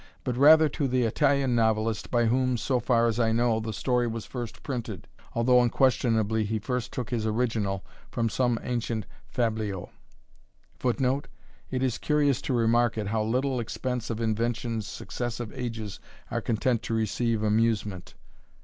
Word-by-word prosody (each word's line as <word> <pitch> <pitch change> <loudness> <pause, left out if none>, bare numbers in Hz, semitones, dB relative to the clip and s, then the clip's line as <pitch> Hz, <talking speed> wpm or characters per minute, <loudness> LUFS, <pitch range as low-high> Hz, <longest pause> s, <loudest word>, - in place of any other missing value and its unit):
but 125 - -1
rather 155 +4 +7
to 145 -1 -1
the 130 -1 +1
Italian 135 +3 +2
novelist, 110 -1 +1
by 120 -1 +2
whom, 125 +2 +2
so 125 +2 0
far 120 0 +2
as 115 0 0
I 115 -1 +3
know, 115 0 +2
the 110 0 -4
story 125 +1 0
was 115 -1 -4
first 120 -3 -7
printed, 115 - -5 0.3
although 125 +1 +4
unquestionably 115 -3 +2
he 110 +1 -1
first 125 +3 -3
took 125 -1 -4
his 110 -3 0
original 110 -4 -1 0.2
from 115 -2 0
some 120 +1 +1
ancient 115 -3 -2 0.3
fabliau." 110 -6 -1 0.9
[Footnote: 130 +2 0 0.4
It 130 0 -1
is 125 -3 0
curious 145 -4 +2
to 135 - -2
remark 115 0 +2
at 105 -2 -2
how 110 +1 0
little 125 +4 0
expense 125 +1 -3
of 115 -1 -3
invention 115 +1 -1
successive 120 +2 -5
ages 115 -6 -5 0.3
are - - -1
content 115 +1 0
to 115 - -2
receive 110 0 0
amusement. 105 -4 0
115 Hz, 155 wpm, -27 LUFS, 110-125 Hz, 0.9 s, rather